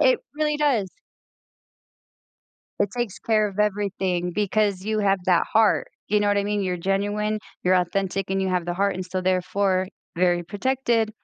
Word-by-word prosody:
It - - +4 0.2
really 300 -1 +1
does. 270 -10 +1 1.9
It 200 - +1
takes 240 -6 -2
care 215 -2 +2
of 200 0 -11
everything 195 -4 0
because 205 -2 0
you 215 +1 0
have 195 -2 +2
that 180 -2 +4
heart, 220 0 +3 0.2
you 210 +1 +3
know 205 - +2
what 205 - +2
I 200 - +1
mean? 205 0 -1
You're 180 -1 -1
genuine, 205 +4 -1 0.3
you're 185 +1 +4
authentic, 185 +1 0
and 195 0 +1
you 190 - 0
have 180 -2 0
the 175 - -2
heart, 200 +2 +1
and 185 - -4
so 185 +1 -3
therefore, 185 +1 +1 0.3
very 175 0 +2
protected, 230 +2 0
200 Hz, 170 wpm, -24 LUFS, 185-210 Hz, 1.9 s, It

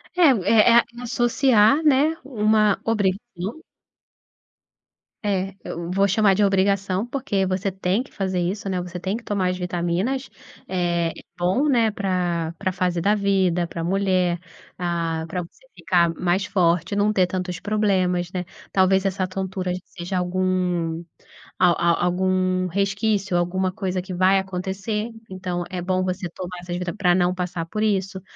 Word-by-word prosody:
É-é 235 - +5
a 235 - +6 0.2
associar, 240 +2 +3
né, 300 +2 +4
uma 215 -4 +2
obrigação. 205 - -2 1.6
Eh, 195 -1 -1
eu 170 0 -5
vou 195 +2 +2
chamar 200 0 +3
de 205 +2 +2
obrigação, 195 0 +1
porque 240 -7 -1
você 190 +1 -1
tem 190 +4 0
que 270 - -19
fazer 190 -2 -2
isso, 195 +4 -2
né, 185 -2 -1
você 180 0 -6
tem 190 +3 -2
que 235 - -7
tomar 200 -4 0
as 180 - -4
vitaminas, 180 +9 -2 0.4
eh, 175 -2 0 0.3
bom 190 +12 +2
né, 230 -5 +3
pra 180 -5 -1
pra 190 -2 -2
fase 180 -1 0
da 200 +5 +2
vida 190 -4 +1
pra 165 0 -5
mulher 185 -2 +1 0.4
pra 165 -2 -2
pra 180 +2 -3
você 170 - -18
ficar 170 -2 +2
mais 180 +3 +1
forte, 175 0 +1
não 205 +1 +2
ter 185 -2 +3
tantos 180 0 -3
problemas, 185 -4 0
né, 180 -1 -2 0.3
talvez 190 0 +3
essa 190 -1 0
tontura 185 0 -3
seja 180 +1 -5
algum 180 -2 0 0.6
al 180 -2 +5
al 170 0 +2
algum 185 0 +1
resquício, 200 +1 0
alguma 185 +2 0
coisa 185 0 -2
que 185 0 -7
vai 185 +2 +4
acontecer, 190 +4 -3 0.2
então 180 -2 -3
é 185 -2 -4
bom 185 +1 0
você 185 0 -2
tomar 180 0 -6
essas 175 0 -5
vita 180 -1 -3
pra 180 -4 +2
não 180 0 +2
passar 180 -2 -3
por 210 +5 -4
isso, 195 -2 0
185 Hz, 150 wpm, -23 LUFS, 180-200 Hz, 1.6 s, a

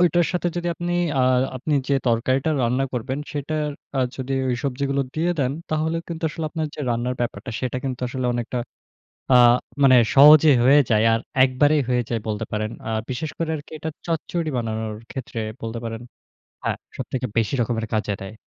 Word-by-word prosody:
ওইটার 175 -1 +4
সাথে 175 0 0
যদি 175 0 -1
আপনি 175 +1 -3 0.3
আ - - +4 0.4
আপনি 145 +4 -1
যে 140 - +3
তরকারিটা 130 +5 +1
রান্না 125 +3 +1
করবেন 130 +3 -3
সেটার 150 +1 -2 0.3
আ - - +1 0.2
যদি 135 0 -4 0.2
ওই 125 - +1
সবজিগুলো 140 +1 0
দিয়ে 165 +3 +1
দেন, 130 -1 +1 0.2
তাহলে 160 +1 0
কিন্তু 165 -1 -6
আসলে 160 +1 -5
আপনার 160 -1 -2
যে - - -7
রান্নার 120 +2 -1
ব্যাপারটা, 120 +1 -3
সেটা 130 0 -2
কিন্তু 130 -2 -3
আসলে 130 -1 -2
অনেকটা 120 +1 -2 0.7
আ - - +7 0.5
মানে 130 -2 +7 0.2
সহজেই 150 0 +8
হয়ে 140 +3 +7
যায়। 110 0 +4
আর 115 - +2 0.2
একবারেই 145 +3 +3
হয়ে 125 -1 +2
যায় 115 -2 -1
বলতে 110 +1 -2
পারেন। 110 0 -1 0.2
আ - - -3 0.2
বিশেষ 150 +5 -3
করে 165 -1 -1
আরকি 145 - -11
এটা 160 +1 -4 0.2
চচ্চড়ি 165 0 -2
বানানোর 110 -2 -3
ক্ষেত্রে 125 -3 -6 0.2
বলতে 115 +1 -4
পারেন 115 0 -4 0.6
হ্যাঁ, - - -1 0.2
সবথেকে 130 -1 -3
বেশি 115 +1 +1
রকমের 115 -1 -1
কাজ 110 - +1 0.2
দেয়। 95 +2 -7
130 Hz, 180 wpm, -23 LUFS, 120-155 Hz, 0.7 s, সহজেই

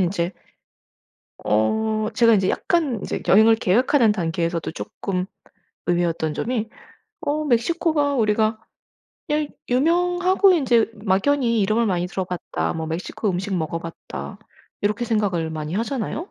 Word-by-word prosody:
인제 175 -1 0 1.1
어. 215 - +1
제가 230 -1 +5
인제 190 -2 +2
약간 315 -8 0
인제 200 - -4
여행을 220 +4 +7
계획하는 230 +3 +3
단계에서도 170 -3 -2
쪼끔 180 +1 -4 0.6
의외였던 170 -3 0
점이 230 -2 -2 0.5
어 305 +1 -1
'멕시코가 290 +3 +1
우리가 215 -1 +1 0.7
일 300 0 0 0.2
유명하고 355 +7 +3
인제 245 -9 +3
막연히 230 +4 +2
이름을 215 +3 +2
많이 180 -2 0
들어 190 +1 -3
봤다. 180 -1 -3
뭐 160 -1 -4
멕시코 175 +5 -3
음식 190 +2 -2
먹어 165 0 -2
봤다.' 165 0 -8 0.4
이렇게 210 +3 0
생각을 195 -8 0
많이 155 +1 -4
하잖아요. 240 - -3
215 Hz, 295 characters per minute, -22 LUFS, 180-255 Hz, 1.1 s, 여행을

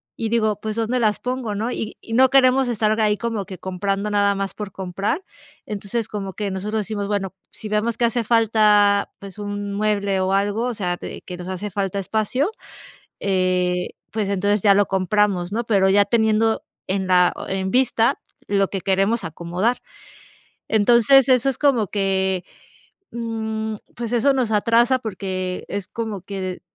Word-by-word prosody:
y 225 -2 -3
digo: 215 -3 +1
"Pues, 215 0 -3
¿dónde 230 +2 0
las 215 -2 +1
pongo", 250 -4 -3
¿no? 225 +4 -2
Y 220 -2 -5
y 225 - -8
no 260 +2 +5
queremos 265 -1 +4
estar 215 -1 +1
ahí 210 -1 +2
como 230 -4 -3
que 185 - -8
comprando 195 +2 -2
nada 200 -1 +3
más 195 0 -3
por 205 -2 -6
comprar. 195 - -3 0.4
Entonces, 210 +2 -3
como 195 -3 -5
que 205 -2 -3
nosotros 210 +3 -2
decimos: 205 -1 -3
"Bueno, 195 -2 -2 0.2
si 215 - -8
vemos 215 +2 0
que 240 - +2
hace 235 0 0
falta, 210 -3 +3
pues 200 0 -10
un 205 0 -4
mueble 200 -2 0
o 190 +1 0
algo, 205 +4 +1
o 245 - -2
sea, 180 -3 -2
t - - -8
que 180 - -6
nos 180 +1 -8
hace 195 +3 -4
falta 195 0 -2
espacio", 220 - 0 0.7
eh, 185 -2 0 0.2
pues 215 -2 -1
entonces 200 +1 +1
ya 200 -1 +6
lo 205 0 +4
compramos, 190 -1 +1
¿no? 230 +2 -2
Pero 195 -4 +3
ya 200 +1 +5
teniendo 220 -1 +2 0.2
en 190 0 -1
la 180 -1 +5 0.2
e 190 - -2
en 190 0 -2
vista 245 -3 +2 0.3
lo 195 -1 +1
que 195 -2 -4
queremos 195 +4 +1
acomodar, 175 +9 -1 0.9
entonces, 240 +5 +5
eso 255 +1 +4
es 260 - -6
como 250 -9 +2
que, 190 -2 0 0.7
mm, 220 -2 -3 0.2
pues 235 0 -4
eso 270 +4 +3
nos 250 -4 0
atrasa 230 +4 +3
porque 185 -4 -4
es 200 -2 -4
como 220 -5 -5
que, 195 0 -6
d 185 -1 -4
210 Hz, 175 wpm, -22 LUFS, 195-225 Hz, 0.9 s, ya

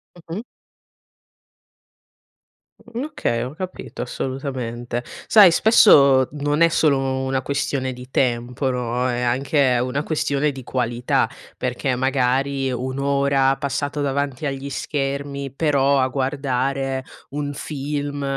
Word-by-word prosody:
Mh 165 -1 -10
mh. 215 - -4 2.4
Mhmm, 235 +2 -6
okay, 290 - -2
ho 130 - -6
capito 185 +2 -7
assolutamente. 125 -2 -4 0.2
Sai 205 -5 +8
spesso 140 - +6
non 145 +1 -1
è 170 - +7
solo 155 -4 +3 0.3
una 130 0 -1
questione 135 -2 -1
di 125 +1 -11
tempo, 125 +1 0
no, 125 0 -1
è 120 -1 -1
anche 130 +1 +2
una 130 +3 -1
questione 150 -1 0
di 135 -2 -9
qualità, 120 -1 0 0.3
perché 125 +1 -1
magari 135 +1 +1
un'ora 135 +1 +1
passata 145 +1 -2
davanti 140 0 -1
agli 135 0 -4
schermi, 140 -1 -3
però 140 -2 +2
a 130 - +3
guardare 135 0 -1 0.3
un 145 0 -3
film 145 0 -4
135 Hz, 115 wpm, -22 LUFS, 130-145 Hz, 2.4 s, Sai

